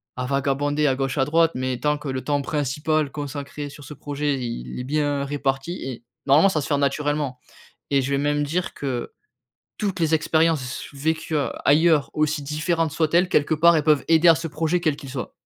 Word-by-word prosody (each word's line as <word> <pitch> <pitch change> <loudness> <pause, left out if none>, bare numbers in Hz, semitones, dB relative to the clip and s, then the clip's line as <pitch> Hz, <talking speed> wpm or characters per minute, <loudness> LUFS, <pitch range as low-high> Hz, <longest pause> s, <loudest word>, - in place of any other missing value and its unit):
à 125 - -3
vagabonder 140 +2 0
à 130 - +2
gauche 135 +1 -2
à 135 - +3
droite, 165 +3 +3
mais 130 -1 -2
tant 150 0 +1
que 145 -1 -7
le 130 0 -3
temps 145 -1 0
principal 150 +1 -1
consacré 145 0 -6
sur 145 +1 -12
ce 150 - -9
projet, 145 0 -2
il 90 - -5
est - - -3
bien 145 0 0
réparti 140 +3 -2
et 125 -3 -6 0.2
normalement 150 +8 +5
ça 160 - 0
va - - -1
se - - -5
faire 145 - +1
naturellement 145 -1 -1 0.5
et 140 -1 +3
je 130 - -3
vais 140 - +2
même 145 +1 +1
dire 175 +5 -2
que 130 -4 -4 0.7
toutes 195 -4 -2
les 160 -1 +3
expériences 160 -1 +2
s 125 +1 -6
vécues, 160 +2 -2
heu, 145 - +1 0.2
ailleurs, 155 0 +4
aussi 150 0 0
différentes 155 +3 -1
soient-elles, 170 +4 +2
quelque 150 -1 +2
part 170 +2 +5
elles 155 - +1
peuvent 150 -3 +3
aider 165 +1 +5
à 165 - +9
ce 165 +1 -4
projet, 165 +3 0
quel 155 -4 +1
qu'il 145 -2 -10
soit. 130 -2 -5
145 Hz, 210 wpm, -23 LUFS, 140-155 Hz, 0.7 s, à